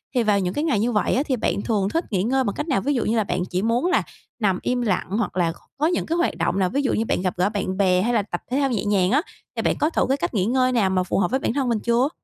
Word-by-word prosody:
thì 245 - +3
vào 210 -2 +3
những 180 -1 -1
cái 295 - -1
ngày 290 -10 +1
như 235 +4 +1
vậy 210 - +1
á, 265 - +2
thì 265 - 0
bạn 200 -4 -1
thường 200 -3 0
thích 330 +9 -1
nghỉ 190 -3 +1
ngơi 265 +4 +1
bằng 205 - -1
cách 295 - -4
nào? 265 - +1
Ví 290 - 0
dụ 245 - 0
như 225 +2 +1
là 220 - +3
bạn 180 -2 -2
chỉ 180 +1 -1
muốn 230 - +1
là 365 - +2 0.4
nằm 195 -5 +1
im 250 0 -1
lặng, 205 -6 0
hoặc 205 -5 -2
là 170 -2 +2
c - - -12 0.2
có 295 - +1
những 350 - 0
cái 330 - -1
hoạt 345 - +1
động 175 +3 0
nào? 185 -2 +2
Ví 280 +7 0
dụ 270 - 0
như 225 - 0
bạn - - 0
gặp 185 -1 -1
gỡ 185 +3 +2
bạn 195 -3 -3
bè, 185 -2 +3
hay 240 +5 0
là 225 - +3
tập 205 - -5
thể 260 - +1
thao 275 -1 +1
nhẹ 225 -4 -1
nhàng 195 -2 +2
á, 280 +5 +4 0.3
thì - - -1
bạn - - +1
có 300 - +2
thử - - +1
cái 270 - +2
cách - - -3
nghỉ 190 -5 +1
ngơi 255 +3 +2
nào 225 -6 +2
mà 185 -1 +1
phù 180 - -1
hợp 180 -3 +1
với 265 - +1
bản 230 - -1
thân 270 -2 0
mình 230 -2 +1
chưa? 235 +5 +2
220 Hz, 345 wpm, -23 LUFS, 190-260 Hz, 0.4 s, á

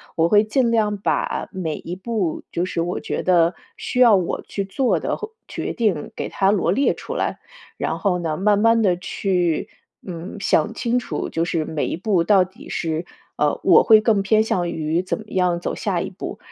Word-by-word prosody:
我 165 0 +3
会 210 +2 +5
尽 235 +3 +1
量 215 -2 +2
把 195 - -1
每 170 -5 -3
一 170 - -7
步， 195 -3 -2
就 170 - 0
是 185 - -4
我 175 +2 -2
觉 - - -3
得 175 -1 +3 0.2
需 250 - -3
要 235 -4 +7
我 180 -3 -1
去 200 - -4
做 250 +7 +1
的 - - -2
或 435 0 -7 0.2
决 - - -4
定 205 -10 0
给 - - -4
它 195 0 +2
罗 195 -4 +1
列 275 +9 +2
出 - - -7
来， - - -2 0.4
然 - - -2
后 190 -3 +1
呢， 160 -3 -2
慢 205 +1 +3
慢 230 +1 +4
地 185 -4 +3
去， 180 -3 -1 0.4
嗯， 175 +2 -7
想 215 +3 +2
清 240 +1 0
楚， - - -4
就 165 - -1
是 165 -2 -1
每 155 -1 -2
一 - - -2
步 190 -3 +1
到 195 +1 +5
底 185 +1 -13
是， 160 0 -2 0.3
呃， - - +1
我 - - +7
会 220 -2 +7
更 215 -2 +2
偏 215 +2 +3
向 175 -5 -1
于 160 0 -1
怎 185 - -3
么 220 - -9
样 180 -2 +1
走 - - -3
下 - - -1
一 - - -4
步。 - - -7
190 Hz, 220 characters per minute, -21 LUFS, 170-215 Hz, 0.4 s, 要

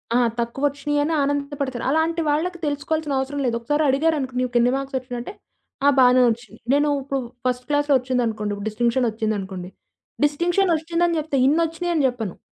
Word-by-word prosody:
ఆ! - - +5 0.2
తక్కువొచ్చినీయని 290 +5 0
ఆనందపడతారు. 280 -3 -2
అలాంటి 325 +2 +1
వాళ్ళకి 345 +4 0
తెలుసుకోవాల్సిన 290 0 -1
అవసరం 280 +2 -3
లేదు. 235 -1 0
ఒకసారి 295 +6 0
అడిగారనుకోండి 270 -3 +1
నీకెన్ని 245 0 +2
మార్క్సొచ్చినియంటే, 260 +2 -4 0.5
ఆ! - - +8
బానే 250 0 +6
ఒచ్చినియి. 230 -2 -5
నేను 290 +1 +3
ఇప్పుడు 275 0 -2 0.3
ఫస్ట్ 250 0 -1
క్లాస్‌లో 290 -1 +3
ఒచ్చిందనుకోండి. 230 -5 -1
ఇప్పుడు 205 +2 -5
డిస్టింక్షనొచ్చిందనుకోండి. 215 -5 -1 0.6
డిస్టింక్షనొచ్చిందని 340 +1 +1
జెప్తే 290 -3 -1
ఇన్నొచ్చినియని 330 +1 +1
జెప్పను. 225 -7 -4
275 Hz, 125 wpm, -22 LUFS, 245-305 Hz, 0.6 s, ఆ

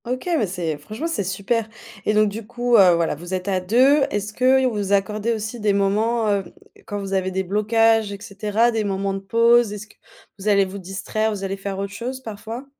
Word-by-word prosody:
OK, 255 +6 -4
mais 225 -10 +1
c'est 175 -4 -3
franchement, 220 +9 -6
c'est 330 -11 -1
super 200 +4 -1 0.4
et 215 - +1
donc 215 0 +4
du 210 +1 -6
coup, 240 +1 0
heu, 185 -5 +7
voilà, 170 -1 0
vous 175 +5 -5
êtes 185 +1 -5
à 190 -2 +1
2. 255 +10 +4
Est-ce 205 -1 -3
que 255 +3 +4
et 265 - +1
vous 205 -5 -1
accordez 210 +3 0
aussi 220 +1 -4
des 210 -2 +1
moments, 215 +3 +1
heu, 200 -1 +1 0.4
quand 205 - -4
vous 195 -1 -5
avez 190 -1 0
des 190 0 -2
blocages 220 +2 +2
et 200 - -7
cetera, 210 +3 0
des 225 -2 -1
moments 195 -1 -1
de 195 - -3
pause? 230 +3 +3
Est-ce 210 0 -7
que 210 - -21 0.5
vous 195 - -6
allez 200 -2 +4
vous 195 +1 -7
distraire, 195 +4 -2
vous 205 -2 -4
allez 195 0 -2
faire 195 0 -5
autre 200 0 -4
chose, 250 +5 -5
parfois? 225 +3 -7
210 Hz, 225 wpm, -22 LUFS, 195-230 Hz, 0.5 s, heu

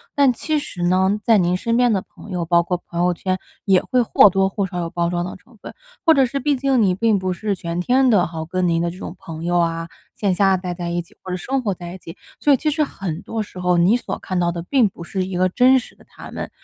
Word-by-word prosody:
但 280 -3 +4
其 310 +5 -1
实 200 -11 -5
呢， 190 +3 +2
在 225 0 +5
您 180 -1 +2
身 230 +5 0
边 245 -2 +3
的 195 - 0
朋 205 - -14
友， 180 -2 -2
包 170 +1 +3
括 180 +1 -1
朋 170 - -4
友 180 0 +2
圈， 185 +2 -2 0.3
也 190 -2 +4
会 255 -1 +1
或 210 -3 +5
多 195 +1 +2
或 200 0 -2
少 180 -1 -5
有 170 -1 -3
包 170 0 -1
装 175 0 -1
的 180 - -6
成 225 +5 -20
分。 - - -10 0.3
或 325 - +6
者 270 -2 +4
是 275 +3 -3
毕 285 +2 +1
竟 265 -2 +1
你 190 -4 +3
并 215 0 +2
不 185 0 -2
是 205 +3 -2
全 170 -2 -4
天 255 +8 +3
的 200 -6 +4
哈， 160 -1 -5
跟 185 +1 0
您 165 -1 +1
的 170 - 0
这 175 - -9
种 185 - -7
朋 160 -1 -8
友 175 +1 +1
啊， 165 -1 -1 0.3
线 200 -3 0
下 195 +1 +3
待 180 -1 -4
在 175 0 -5
一 175 0 -2
起， 200 +6 -24
或 - - -10
者 180 - -2
生 265 +8 -2
活 215 -5 -1
在 175 0 -8
一 190 - -10
起， 165 -1 -11 0.2
所 295 - +3
以 275 - +6
其 305 +4 0
实 305 +1 +1
很 185 - -5
多 225 0 -4
时 185 - -11
候 180 -1 +2
你 180 +6 +4
所 245 - -4
看 185 -1 -3
到 175 -1 +1
的 170 -1 -5
并 235 +3 +2
不 170 - -11
是 185 +2 -3
一 185 -1 -4
个 185 +1 +3
真 255 +7 +5
实 250 - -6
的 - - -21
他 - - -12
们。 - - -5
185 Hz, 305 characters per minute, -21 LUFS, 175-230 Hz, 0.3 s, 或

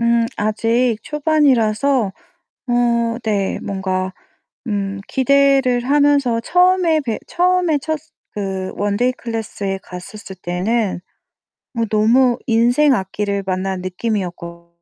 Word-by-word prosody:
음, 235 0 +2
아직 225 +3 +1
초반이라서 275 -6 +2 0.6
어 235 -1 +1
네 200 -3 0
뭔가 190 -1 -2 0.6
음 200 -2 -2
기대를 270 -2 +3
하면서 285 -4 +3
처음에 360 +1 +3
배 235 -6 -3
처음에 360 -3 +2
첫 315 0 -2 0.3
그 190 -2 -4
원데이 205 +5 +1
클래스에 220 -5 -4
갔었을 190 +2 -10
때는 190 +3 -1 0.8
어 230 - +2
너무 240 +3 +3
인생 245 +5 +3
악기를 200 0 -2
만난 185 0 -2
느낌이었거든요. 180 -3 -4
230 Hz, 230 characters per minute, -19 LUFS, 195-265 Hz, 0.8 s, 기대를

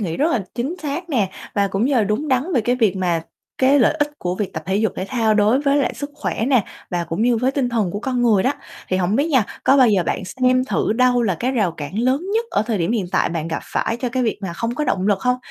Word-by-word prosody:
nghĩ 170 -6 -2
rất 315 +4 +1
là 215 -6 0
chính 260 +8 -2
xác 310 +4 -4
nè, 215 -9 +1 0.2
và 200 -1 +2
cũng 195 +4 0
như 280 - +1
là 230 -4 +3
đúng 215 +9 -1
đắn 265 +8 0
về 245 - +4
cái 245 +3 0
việc 220 -6 +2
mà 175 -3 0 0.4
cái 270 +2 +4
lợi 240 - +4
ích 295 -1 0
của 180 0 -2
việc 205 -1 -3
tập 160 - -5
thể 190 +1 0
dục 220 +1 +1
thể 185 - -2
thao 225 -4 +1
đối 215 +5 +3
với 280 -1 +2
lại 280 - 0
sức 285 +2 -6
khỏe 225 - -2
nè, 250 -7 +3 0.3
và 175 -1 -1
cũng 165 +6 -2
như 240 0 +3
với 250 +4 +1
tinh 270 -2 -1
thần 225 -6 0
của 205 - -4
con 250 0 -1
người 215 -5 +4
đó. 265 - +2 0.4
Thì 185 - +1
hổng 185 +3 +1
biết 290 +5 +1
nha, 260 -8 +3 0.2
có 270 - +5
bao 255 -3 +6
giờ 200 -4 +3
bạn - - -1
xem 255 +5 +1
thử 215 - 0
đâu 250 +1 +3
là 195 -6 +1
cái 250 +9 -2
rào 210 -9 +1
cản 165 +6 -6
lớn 260 +4 +2
nhất 460 - +1
ở 205 - +1
thời 225 -3 -1
điểm 175 +6 0
hiện 205 -6 -1
tại - - +2
bạn 165 -1 -3
gặp 165 - -3
phải 230 - -2
cho 250 +1 -2
cái 255 +2 -1
việc 225 -4 -1
mà 190 - -3
không 230 +7 -3
có 300 - -1
động 190 -6 0
lực 200 -2 +2
hông? 250 0 +1
230 Hz, 295 wpm, -20 LUFS, 195-260 Hz, 0.4 s, bao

